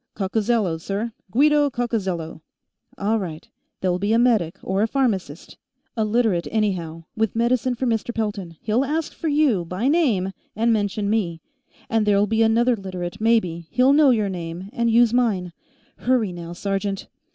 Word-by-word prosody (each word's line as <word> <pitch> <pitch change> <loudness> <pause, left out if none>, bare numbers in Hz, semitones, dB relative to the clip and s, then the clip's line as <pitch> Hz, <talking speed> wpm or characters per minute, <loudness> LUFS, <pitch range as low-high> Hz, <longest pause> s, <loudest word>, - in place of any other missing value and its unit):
"Coccozello, 200 -3 0
sir. 205 +6 -3 0.2
Guido 290 +6 +4
Coccozello." 190 - -3 0.6
"All 215 +3 +1
right. 165 -5 -6 0.3
There'll 180 -1 0
be 205 +3 +1
a - - +4
medic 225 -9 +2
or 190 +1 0
a 220 - +3
pharmacist 210 - -2 0.4
a 220 - +1
Literate, 215 -5 +1
anyhow 180 -7 -1
with 220 -2 0
medicine 245 +1 +1
for 255 - -2
Mr. 230 0 0
Pelton. 205 -7 -4
He'll 225 +4 +1
ask 305 +3 -2
for 330 - -5
you, 290 - +2
by 180 +8 -2
name, 250 - +2 0.2
and 230 +2 +2
mention 205 -1 -1
me. 195 -6 0 0.5
And 225 -2 +1
there'll 205 0 +4
be 220 +2 0
another 235 +2 +3
Literate, 185 0 -6
maybe; 185 -8 +1
he'll 255 +3 +4
know 295 -1 +6
your 220 -5 +2
name, 175 +1 -6
and 235 -1 +1
use 235 0 +4
mine. 200 -8 +1 0.4
Hurry, 240 -6 +1
now, 170 -1 -7
sergeant." 195 +1 -3
215 Hz, 160 wpm, -23 LUFS, 185-235 Hz, 0.6 s, know